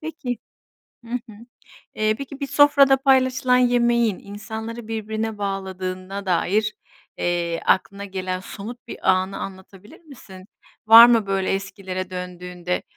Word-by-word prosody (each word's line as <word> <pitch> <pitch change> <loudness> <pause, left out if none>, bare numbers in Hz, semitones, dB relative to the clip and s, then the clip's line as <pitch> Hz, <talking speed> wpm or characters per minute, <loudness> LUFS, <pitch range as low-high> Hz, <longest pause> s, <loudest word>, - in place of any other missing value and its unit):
Peki, 295 -7 -5 0.7
hı 230 - -13
hı, 245 -2 -5 0.6
eee, 215 0 +1
peki, 275 +1 -8
bir 280 - -2
sofrada 280 -1 +5
paylaşılan 260 -2 +3
yemeğin 240 -3 +2
insanları 220 +2 -8
birbirine 220 0 -3
bağladığına 190 0 -4
dair, 205 +4 +1 0.4
eee, 170 -1 -1
aklına 200 +1 +1
gelen 185 -2 -4
somut 215 +5 -9
bir - - 0
anı 190 +1 0
anlatabilir 190 +1 -10
misin? 205 - -14 0.4
Var 225 +2 +11
mı 230 -3 +3
böyle 195 -1 0
eskilere 190 -1 -5
döndüğünde, 180 -1 -5
205 Hz, 120 wpm, -22 LUFS, 185-240 Hz, 0.7 s, Var